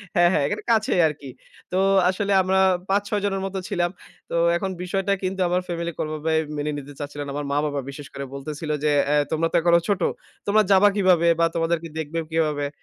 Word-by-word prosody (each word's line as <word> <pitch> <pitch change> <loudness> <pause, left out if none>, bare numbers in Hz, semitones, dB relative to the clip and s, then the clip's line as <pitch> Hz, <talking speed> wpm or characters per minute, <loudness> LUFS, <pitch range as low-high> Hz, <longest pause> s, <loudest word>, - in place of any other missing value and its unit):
হ্যাঁ, 175 0 +5
হ্যাঁ 145 - +2
এখানে - - -3
কাছেই 215 -5 +2
আরকি। 145 -3 -7 0.4
তো 185 - 0 0.3
আসলে 200 +1 -1
আমরা 190 +1 +1 0.3
৫-৬ 205 +1 0
জনের 195 -1 -1
মত 195 - -5
ছিলাম। 175 0 0 0.4
তো - - -7 0.2
এখন 195 - -3
বিষয়টা 195 +2 0
কিন্তু 190 +1 -2
আমার 180 +1 +1
ফ্যামিলিতে 170 -1 -4
ওভাবে 155 +1 -2 0.2
মেনে 150 +1 -2
নিতে 145 0 -8
চাচ্ছিল 145 0 -6
না। 140 - -7
আমার 145 -1 -3
মা-বাবা 145 0 0
বিশেষ 140 +1 -9
করে 140 - -5
বলতেছিল 150 +3 -6
যে, 150 - +3 0.2
আ - - +3 0.2
"তোমরা 160 +1 +1
তো - - -3
এখনো 170 0 +5
ছোট। 200 -2 0 0.5
তোমরা 215 +2 +4
যাবা 195 +2 +6
কিভাবে 180 -4 +3
বা 165 - +5
তোমাদেরকে 165 0 0
দেখবে 160 +1 -3
কিভাবে?" 150 -3 0
170 Hz, 190 wpm, -23 LUFS, 150-190 Hz, 0.5 s, যাবা